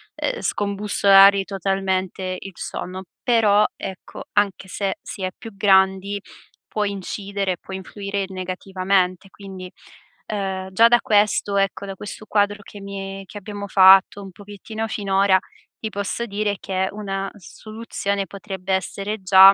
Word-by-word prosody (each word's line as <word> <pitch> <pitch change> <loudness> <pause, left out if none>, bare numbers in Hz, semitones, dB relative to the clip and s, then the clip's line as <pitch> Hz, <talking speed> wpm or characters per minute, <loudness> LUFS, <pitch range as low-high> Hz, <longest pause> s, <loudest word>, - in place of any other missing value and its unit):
ehm, - - -2
scombussolargli 200 -1 +4
totalmente 190 -1 -2
il 195 -2 -9
sonno, 185 +1 -5 0.2
però 215 -4 +4
ecco, 190 -2 -8
anche 200 -2 +1
se 195 0 -2
si - - -8
è 185 - 0
più 225 -3 -10
grandi 195 0 +3 0.5
può 210 -1 -1
incidere, 195 -1 -3
può 190 - -11
influire 200 +1 -4
negativamente. 185 0 -1
Quindi, 190 -2 -10 0.6
ehm, 190 -2 -3
già 225 +5 +6
da 240 0 +6
questo, 205 -1 +2
ecco 195 0 0
da 195 - -5
questo 210 +2 -8
quadro 205 0 +1
che 205 0 -11
mi 195 0 -6
che 205 - -10
abbiamo 205 0 -6
fatto 190 +1 +6
un 195 - -8
pochettino 205 +3 -6
finora, 195 -2 +2 0.4
ti 220 - -3
posso 200 +3 -3
dire 205 -1 -1
che 190 0 -1
una 195 -1 -4
soluzione 205 0 -4
potrebbe 190 -1 -5
essere 200 +3 -2
già 190 +1 +9
195 Hz, 135 wpm, -22 LUFS, 190-205 Hz, 0.6 s, già